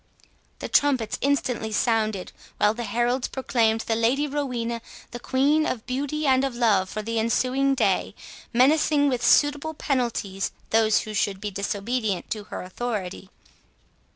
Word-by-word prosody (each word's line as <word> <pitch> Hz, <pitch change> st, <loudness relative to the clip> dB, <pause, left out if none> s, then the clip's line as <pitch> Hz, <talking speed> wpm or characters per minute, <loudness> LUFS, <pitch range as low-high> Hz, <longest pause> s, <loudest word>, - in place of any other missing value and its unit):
The -, -, -5 dB
trumpets 265 Hz, -6 st, +2 dB
instantly 260 Hz, -5 st, 0 dB
sounded, 215 Hz, -3 st, 0 dB, 0.3 s
while 210 Hz, +1 st, +3 dB
the 240 Hz, +1 st, -5 dB
heralds 240 Hz, +4 st, 0 dB
proclaimed 225 Hz, -4 st, 0 dB
the 225 Hz, -, -1 dB
Lady 240 Hz, +6 st, +2 dB
Rowena 250 Hz, -5 st, -3 dB, 0.3 s
the 240 Hz, -, -6 dB
Queen 285 Hz, +5 st, +2 dB
of 230 Hz, -4 st, -3 dB
Beauty 285 Hz, +4 st, -2 dB
and 265 Hz, -1 st, +3 dB
of 270 Hz, -3 st, -2 dB
Love 205 Hz, -6 st, +2 dB
for 215 Hz, -, -5 dB
the 230 Hz, +1 st, -1 dB
ensuing 255 Hz, +4 st, +1 dB
day, -, -, 0 dB, 0.4 s
menacing 285 Hz, +3 st, +3 dB
with 250 Hz, -2 st, -2 dB
suitable 290 Hz, +2 st, +3 dB
penalties 235 Hz, -9 st, -2 dB, 0.2 s
those 220 Hz, -1 st, +4 dB
who 215 Hz, -, -7 dB
should 200 Hz, -2 st, 0 dB
be 210 Hz, 0 st, -4 dB
disobedient 200 Hz, +1 st, -2 dB
to 210 Hz, -2 st, -4 dB
her -, -, -6 dB
authority. 190 Hz, -2 st, -5 dB
240 Hz, 145 wpm, -25 LUFS, 215-270 Hz, 0.4 s, those